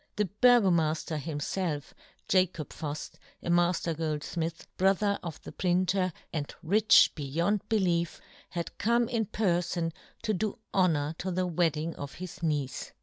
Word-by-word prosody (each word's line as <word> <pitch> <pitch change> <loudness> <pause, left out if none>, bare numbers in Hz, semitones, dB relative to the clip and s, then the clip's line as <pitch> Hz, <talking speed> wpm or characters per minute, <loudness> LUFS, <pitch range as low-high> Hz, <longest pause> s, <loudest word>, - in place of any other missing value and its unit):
The 210 - +2
Burgomafter 180 -9 +3
himfelf, 150 +1 -3 0.3
Jacob 185 -5 +2
Fuft, 150 -1 -6 0.3
a 170 - -1
mafter 175 -1 +2
goldfmith, 160 +1 -3
brother 200 +2 +2
of 160 -3 -6
the - - -8
printer, 185 +1 +1 0.2
and 145 -3 -3
rich 210 +6 +6
beyond 170 +8 -1
belief, 175 -6 +1 0.3
had 170 -2 -4
come 235 +2 +3
in 225 -3 -1
perfon 175 -5 0 0.3
to 215 -2 +1
do 210 +3 -1 0.2
honour 160 -6 +2
to 190 - -2
the 185 0 0
wedding 165 -2 0
of 140 -1 -7
his 180 -1 -8
niece. 150 -5 -2
175 Hz, 135 wpm, -29 LUFS, 160-190 Hz, 0.3 s, rich